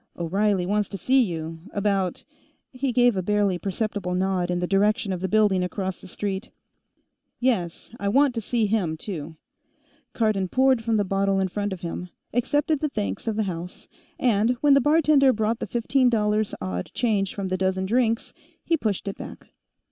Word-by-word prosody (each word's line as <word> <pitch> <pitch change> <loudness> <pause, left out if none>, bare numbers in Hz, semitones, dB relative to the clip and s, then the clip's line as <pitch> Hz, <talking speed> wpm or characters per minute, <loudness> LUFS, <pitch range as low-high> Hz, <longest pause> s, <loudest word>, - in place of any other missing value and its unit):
"O'Reilly 190 +2 +1
wants 205 +2 0
to 195 - -5
see 260 +6 +3
you. 165 -6 -3
About 200 -3 -1 0.2
" - - -41
He 260 0 -2
gave 245 -2 +4
a 185 - 0
barely 200 -1 +1
perceptible 195 -1 -2
nod 185 -1 0
in 175 0 0
the 180 - 0
direction 200 +2 +1
of 180 - -4
the 190 - 0
building 200 -2 +3
across 190 0 -3
the - - -11
street. 195 +3 -4 0.9
"Yes; 225 -8 -1
I 200 - -2
want 275 +4 +4
to 230 - -3
see 225 +1 0
him, 195 -7 0
too." 160 -3 -6 0.8
Cardon 215 -4 +1
poured 260 +2 +3
from 225 -1 +1
the 205 - +2
bottle 195 0 +1
in 190 -1 0
front 205 +2 -2
of 185 -2 -6
him, 180 +1 -5 0.2
accepted 290 +5 +1
the 305 - -1
thanks 100 - -4
of 220 - 0
the 215 - +1
house, 180 -2 -6 0.3
and, 235 0 +2
when 290 -1 +5
the 275 - +5
bartender 295 -2 +4
brought 220 0 0
the - - -4
fifteen 250 +2 +2
dollars 210 -2 +1
odd 90 -2 -4
change 205 -5 0
from 195 -2 -3
the 185 - 0
dozen 190 0 0
drinks, 230 +2 0 0.3
he 335 - +2
pushed 215 - -2
it 195 - -4
back. - - -10
205 Hz, 185 wpm, -25 LUFS, 185-235 Hz, 0.9 s, when